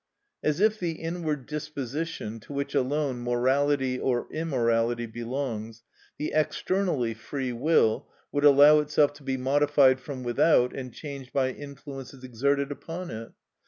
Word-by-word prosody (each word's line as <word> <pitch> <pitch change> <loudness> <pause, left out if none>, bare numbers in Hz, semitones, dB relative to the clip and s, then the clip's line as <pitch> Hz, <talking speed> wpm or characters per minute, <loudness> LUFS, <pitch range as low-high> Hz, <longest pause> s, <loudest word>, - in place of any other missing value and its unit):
As 150 +1 +1
if 215 +1 +3
the 170 -2 -1
inward 160 -4 -3
disposition, 150 -5 -4
to 125 - -11
which 140 0 -3
alone 140 -1 0
morality 130 +2 +1
or 125 -2 0
immorality 120 -6 0
belongs, 115 -1 -5 0.3
the 150 - -3
externally 155 -5 0
free 125 +3 -4
will, 120 -3 +2 0.2
would 145 - -1
allow 145 +1 +8
itself 150 -1 +2
to 145 0 -16
be 135 -1 -1
modified 135 0 +4
from 130 -1 -7
without 125 +1 +3
and 130 -2 -6
changed 140 -1 -8
by 130 -1 +1
influences 135 -2 -9
exerted 140 +3 0
upon 170 +5 -6
it! 115 +1 -7
140 Hz, 135 wpm, -27 LUFS, 125-150 Hz, 0.3 s, allow